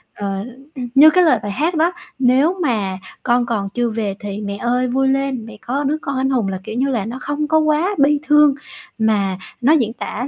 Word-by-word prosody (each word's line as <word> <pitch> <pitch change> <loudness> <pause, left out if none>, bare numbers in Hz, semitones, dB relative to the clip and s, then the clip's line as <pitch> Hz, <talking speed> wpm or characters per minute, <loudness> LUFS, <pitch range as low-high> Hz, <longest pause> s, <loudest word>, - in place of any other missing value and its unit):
Ờ, 195 -1 -3
l - - -8 0.3
ưm, 250 -2 -5
như 295 +3 +9
cái 365 +3 +4
lời 280 -9 +4
bài 205 - -3
hát 315 - -1
đó: 325 +3 +2 0.3
"Nếu 270 +8 +3
mà 210 - -1 0.3
con 240 0 +2
còn 210 -4 -2
chưa 240 +3 -1
về 215 -3 -3
thì 205 0 -6
mẹ 200 -1 -4
ơi 245 +3 0
vui 265 +2 +1
lên, 270 -3 -1
mẹ 225 -2 -11
có 270 +4 -2
đứa 290 +2 0
con 275 -1 -3
anh 265 +1 0
hùng" 245 -6 0
là 190 -1 -3
kiểu 220 - -7
như 265 +3 0
là 230 -7 -1
nó 240 +4 -6
không 290 +1 -2
có 315 +1 +3
quá 310 +6 +1
bi 290 +1 +3
thương, 295 -2 +5 0.4
mà 205 -4 +1 0.2
nó 275 +6 +4
diễn 235 -8 +1
tả 245 +1 -5
250 Hz, 235 wpm, -19 LUFS, 220-290 Hz, 0.4 s, như